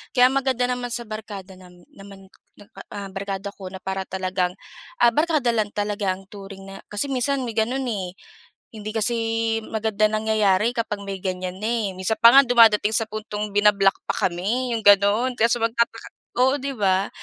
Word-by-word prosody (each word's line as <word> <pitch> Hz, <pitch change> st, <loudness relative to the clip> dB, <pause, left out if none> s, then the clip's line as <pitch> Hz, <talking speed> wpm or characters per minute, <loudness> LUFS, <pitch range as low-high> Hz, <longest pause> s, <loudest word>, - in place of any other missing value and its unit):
Kaya 250 Hz, -1 st, +7 dB
maganda 265 Hz, -2 st, +1 dB
naman 245 Hz, 0 st, -3 dB
sa 235 Hz, 0 st, -4 dB
barkada 205 Hz, -3 st, -8 dB
nam 180 Hz, -1 st, -17 dB
naman, 195 Hz, -1 st, -13 dB, 0.7 s
ah, 200 Hz, -1 st, -5 dB
barkada 195 Hz, 0 st, -4 dB
ko 190 Hz, -, -9 dB
na 190 Hz, -, -7 dB
para 190 Hz, 0 st, -3 dB
talagang, 185 Hz, -1 st, -2 dB, 0.5 s
ah, 240 Hz, 0 st, +6 dB
barkada 305 Hz, -4 st, +2 dB
lang 215 Hz, -2 st, 0 dB
talaga 205 Hz, -1 st, -1 dB
ang 195 Hz, +1 st, -15 dB
turing 195 Hz, -1 st, -10 dB
na 195 Hz, 0 st, -10 dB
kasi 205 Hz, +5 st, -1 dB
minsan 265 Hz, +1 st, 0 dB
may 230 Hz, -, -5 dB
gano'n, 250 Hz, +5 st, 0 dB
eh. 190 Hz, -6 st, -4 dB, 0.6 s
Hindi 215 Hz, -1 st, -6 dB
kasi 225 Hz, +2 st, 0 dB, 0.5 s
maganda 220 Hz, -1 st, -1 dB
nangyayari 215 Hz, 0 st, +1 dB
kapag 220 Hz, -3 st, -2 dB
may 195 Hz, -1 st, -4 dB
ganyan 185 Hz, -1 st, -4 dB
na -, -, -1 dB
eh. 225 Hz, -4 st, -1 dB
Minsan 200 Hz, +4 st, -1 dB
pa 235 Hz, +2 st, +8 dB
nga 275 Hz, -, +9 dB
dumadating 225 Hz, -4 st, +5 dB
sa 225 Hz, -, +1 dB
puntong 210 Hz, -1 st, -5 dB
bina-block 205 Hz, -1 st, +4 dB
pa -, -, +1 dB
kami 225 Hz, +8 st, -2 dB
'yong 225 Hz, -, -3 dB
gano'n 205 Hz, +5 st, +4 dB
kaya 230 Hz, -, +4 dB
so 240 Hz, -, +2 dB
magtataka 230 Hz, 0 st, -1 dB, 0.3 s
oo 265 Hz, +3 st, +3 dB
'di 275 Hz, +1 st, -4 dB
ba? 195 Hz, -2 st, +1 dB
210 Hz, 180 wpm, -23 LUFS, 195-235 Hz, 0.7 s, nga